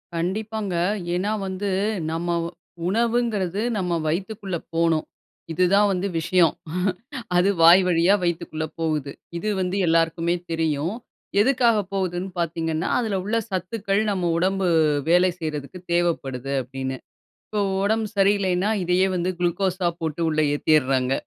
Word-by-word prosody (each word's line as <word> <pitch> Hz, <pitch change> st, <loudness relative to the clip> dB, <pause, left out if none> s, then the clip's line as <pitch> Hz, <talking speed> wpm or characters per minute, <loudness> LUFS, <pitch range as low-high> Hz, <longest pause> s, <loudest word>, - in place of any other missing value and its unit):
கண்டிப்பாங்க. 205 Hz, +3 st, -2 dB, 0.4 s
ஏன்னா 185 Hz, +4 st, 0 dB, 0.2 s
வந்து 190 Hz, +2 st, -3 dB, 0.4 s
நம்ம 165 Hz, +2 st, -3 dB, 0.6 s
உணவுங்றது 220 Hz, -3 st, 0 dB, 0.2 s
நம்ம 180 Hz, -3 st, -1 dB
வயித்துக்குள்ள 195 Hz, +3 st, -2 dB, 0.2 s
போனும். 165 Hz, -1 st, +2 dB, 0.5 s
இது 165 Hz, +3 st, +1 dB
தான் 205 Hz, +1 st, +5 dB
வந்து 190 Hz, +1 st, -1 dB
விஷயம். 170 Hz, +1 st, +3 dB, 0.8 s
அது 180 Hz, +3 st, +4 dB
வாய் 170 Hz, +3 st, +8 dB
வழியா 175 Hz, +3 st, +4 dB
வயித்துக்குள்ள 170 Hz, -2 st, -2 dB
போகுது. 155 Hz, -4 st, -1 dB, 0.3 s
இது 215 Hz, +5 st, -2 dB
வந்து 185 Hz, +1 st, -1 dB
எல்லாருக்குமே 165 Hz, +1 st, +2 dB, 0.2 s
தெரியும். 160 Hz, +2 st, -1 dB, 0.5 s
எதுக்காக 240 Hz, -2 st, +3 dB, 0.2 s
போகுதுன்னு 185 Hz, -1 st, -2 dB
பார்த்தீங்கன்னா, 165 Hz, -1 st, -1 dB
அதுல 220 Hz, -5 st, -1 dB
உள்ள 215 Hz, +4 st, 0 dB
சத்துக்கள் 195 Hz, +2 st, -1 dB
நம்ம 180 Hz, -3 st, 0 dB
உடம்பு 190 Hz, +2 st, +1 dB, 0.4 s
வேலை 180 Hz, +2 st, +5 dB
செய்றதுக்கு 155 Hz, +1 st, -5 dB
தேவைப்படுது 140 Hz, -6 st, -1 dB
அப்டின்னு. 130 Hz, +1 st, -5 dB, 0.5 s
இப்போ 210 Hz, -, -2 dB, 0.2 s
உடம்பு 220 Hz, +1 st, +1 dB
சரியில்லைன்னா 195 Hz, -1 st, +2 dB
இதையே 180 Hz, +2 st, +3 dB
வந்து 180 Hz, +1 st, 0 dB
குளுக்கோஸ்‌ஸா 180 Hz, +1 st, 0 dB
போட்டு 160 Hz, 0 st, -3 dB
உள்ள 155 Hz, -1 st, +1 dB
ஏத்திர்றாங்க. 135 Hz, -4 st, +2 dB
180 Hz, 120 wpm, -23 LUFS, 165-195 Hz, 0.8 s, வாய்